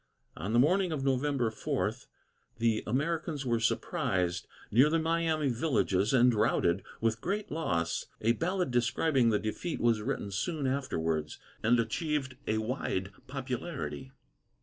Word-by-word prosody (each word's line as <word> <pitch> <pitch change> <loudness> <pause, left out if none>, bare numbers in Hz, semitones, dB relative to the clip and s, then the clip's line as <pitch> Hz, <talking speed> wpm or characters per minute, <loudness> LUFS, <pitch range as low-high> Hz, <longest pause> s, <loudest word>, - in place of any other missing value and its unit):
On 95 +7 -4
the 120 - +3
morning 180 +8 +4
of 145 -4 -2
November 135 -3 +1
4, 110 - -1 0.6
the 115 -1 +1
Americans 150 +3 -1
were 120 -2 +1
surprised 90 -5 0 0.2
near 130 +7 +6
the 165 - +2
Miami 160 -2 +1
villages, 115 - +1
and 125 -1 +5
routed, 100 -4 +2 0.2
with 115 0 +1
great 205 +3 -2
loss. 85 - -1
A 115 - +3
ballad 180 - 0
describing 120 +2 +2
the 105 - +3
defeat 110 +11 -3
was 115 -2 +2
written 105 -4 -3
soon 145 - -2
afterwards, 80 - -1 0.2
and 120 +2 +4
achieved 135 +2 -1
a 110 - +1
wide 110 -4 -2 0.2
popularity. 135 +1 -4
125 Hz, 135 wpm, -31 LUFS, 110-150 Hz, 0.6 s, near